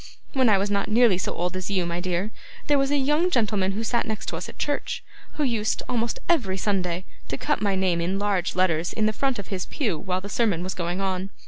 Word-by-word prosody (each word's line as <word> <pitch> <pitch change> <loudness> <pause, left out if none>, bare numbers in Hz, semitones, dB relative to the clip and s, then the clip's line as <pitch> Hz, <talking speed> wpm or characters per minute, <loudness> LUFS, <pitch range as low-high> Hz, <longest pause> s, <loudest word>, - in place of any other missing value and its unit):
When 260 -3 +4
I 205 - +6
was 200 +1 0
not 200 +1 0
nearly 220 -4 +5
so - - -2
old 180 +1 -1
as 185 0 -3
you, 190 -3 +1
my 170 0 -2
dear, 180 +3 -1 0.3
there 290 -1 +4
was 275 0 +2
a 290 - +2
young 295 +6 +3
gentleman 210 - +1
who 220 +3 -2
sat 235 +1 0
next 220 -1 -3
us - - -4
at - - -12
church, 290 -1 -2 0.3
who 305 - -1
used, 230 -5 0
almost 235 -1 0
every 225 - +2
Sunday, 185 -2 -1 0.2
to - - -3
cut 295 -1 0
my 200 -2 +2
name 185 -3 +1
in 185 +3 0
large 200 -4 0
letters 175 -2 +2
in 220 - +1
the 215 - +2
front 270 +3 0
of 200 - -7
his 185 -3 -3
pew 210 - -1
while 185 -1 -1
the 195 - -7
sermon 205 -5 +1
was 185 0 -3
going 175 +2 -2
on. 190 0 -1
200 Hz, 240 wpm, -25 LUFS, 185-235 Hz, 0.3 s, I